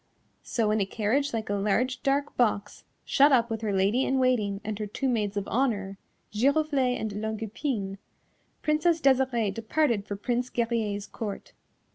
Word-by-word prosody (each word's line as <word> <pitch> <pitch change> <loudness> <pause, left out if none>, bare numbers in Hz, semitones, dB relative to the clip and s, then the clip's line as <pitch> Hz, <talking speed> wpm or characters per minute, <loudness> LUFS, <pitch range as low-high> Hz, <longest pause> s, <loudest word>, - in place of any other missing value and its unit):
So 225 -4 0
in 215 0 +2
a - - +2
carriage 235 +8 0
like 225 -2 -3
a 205 - -1
large 215 +6 0
dark 280 +1 0
box, 215 -4 0 0.2
shut 285 +1 +5
up 235 -3 +3
with 225 -1 -2
her 215 -2 -1
Lady 200 +6 +2
in 270 - +1
Waiting 230 -6 +1
and 215 0 -4
her 210 - -3
two 265 +6 -2
Maids 210 -5 0
of 200 - -2
Honour, 205 -6 -1 0.3
Giroflée 275 +1 +2
and 210 -1 -4
Longue 220 0 -3
Epine, 210 -4 -3 0.6
Princess 315 +2 +2
Desirée 255 -7 +2
departed 225 -1 0
for 200 - -3
Prince 245 +4 -2
Guerrier's 225 -4 -1
Court. 210 -3 -6
225 Hz, 165 wpm, -27 LUFS, 205-265 Hz, 0.6 s, shut